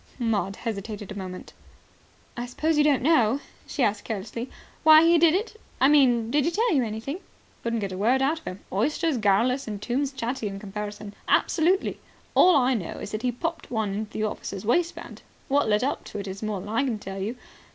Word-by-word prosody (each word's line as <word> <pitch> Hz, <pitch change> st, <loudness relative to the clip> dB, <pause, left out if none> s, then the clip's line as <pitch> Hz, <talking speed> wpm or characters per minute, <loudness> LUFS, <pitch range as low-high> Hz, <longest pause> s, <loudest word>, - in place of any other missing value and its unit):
Maud 220 Hz, -5 st, 0 dB
hesitated 210 Hz, -2 st, -5 dB
a -, -, -6 dB
moment. 185 Hz, -2 st, -7 dB, 0.8 s
"I 240 Hz, 0 st, -4 dB
suppose 310 Hz, +6 st, 0 dB
you 295 Hz, -, +4 dB
don't 290 Hz, -4 st, +3 dB
know," 265 Hz, -5 st, +4 dB, 0.3 s
she 275 Hz, -, -1 dB
asked 210 Hz, -2 st, +1 dB
carelessly, 225 Hz, +3 st, -5 dB, 0.3 s
"why 315 Hz, 0 st, +8 dB
he 335 Hz, 0 st, +5 dB
did 330 Hz, 0 st, +5 dB
it? 440 Hz, +2 st, -3 dB, 0.2 s
I 265 Hz, -, +5 dB
mean, 245 Hz, -6 st, +4 dB
did 295 Hz, +1 st, +3 dB
he 330 Hz, -, +2 dB
tell 445 Hz, +4 st, +1 dB
you 270 Hz, -4 st, +3 dB
anything?" 225 Hz, -, -4 dB, 0.4 s
"Couldn't 230 Hz, -1 st, -1 dB
get 200 Hz, -1 st, -3 dB
a 185 Hz, -, -5 dB
word 240 Hz, +6 st, +3 dB
out 290 Hz, +5 st, +1 dB
of -, -, -24 dB
him. 185 Hz, +2 st, -6 dB
Oysters 295 Hz, -, +1 dB
garrulous 230 Hz, +6 st, +2 dB
and 210 Hz, -2 st, -4 dB
tombs 265 Hz, +6 st, -1 dB
chatty 245 Hz, -3 st, -3 dB
in 195 Hz, -1 st, -5 dB
comparison. 210 Hz, 0 st, -6 dB
Absolutely. 360 Hz, +4 st, +2 dB, 0.3 s
All 365 Hz, -, +6 dB
I 260 Hz, -2 st, +4 dB
know 195 Hz, -9 st, -3 dB
is -, -, -7 dB
that 215 Hz, -, -3 dB
he 250 Hz, 0 st, +1 dB
popped 330 Hz, +7 st, -4 dB
one 220 Hz, -4 st, -1 dB
into 210 Hz, +1 st, -3 dB
the 215 Hz, -, -3 dB
officer's 205 Hz, -2 st, -4 dB
waistband. 335 Hz, +10 st, -1 dB, 0.3 s
What 280 Hz, -4 st, +2 dB
led 210 Hz, +2 st, +2 dB
up 275 Hz, -, -1 dB
to -, -, -7 dB
it 200 Hz, -1 st, -5 dB
is 190 Hz, +1 st, -6 dB
more 215 Hz, -2 st, -2 dB
than 205 Hz, -, -8 dB
I 230 Hz, +5 st, +1 dB
can 245 Hz, -5 st, -1 dB
tell 195 Hz, -1 st, -7 dB
you. 220 Hz, +6 st, -3 dB
235 Hz, 210 wpm, -26 LUFS, 210-290 Hz, 0.8 s, why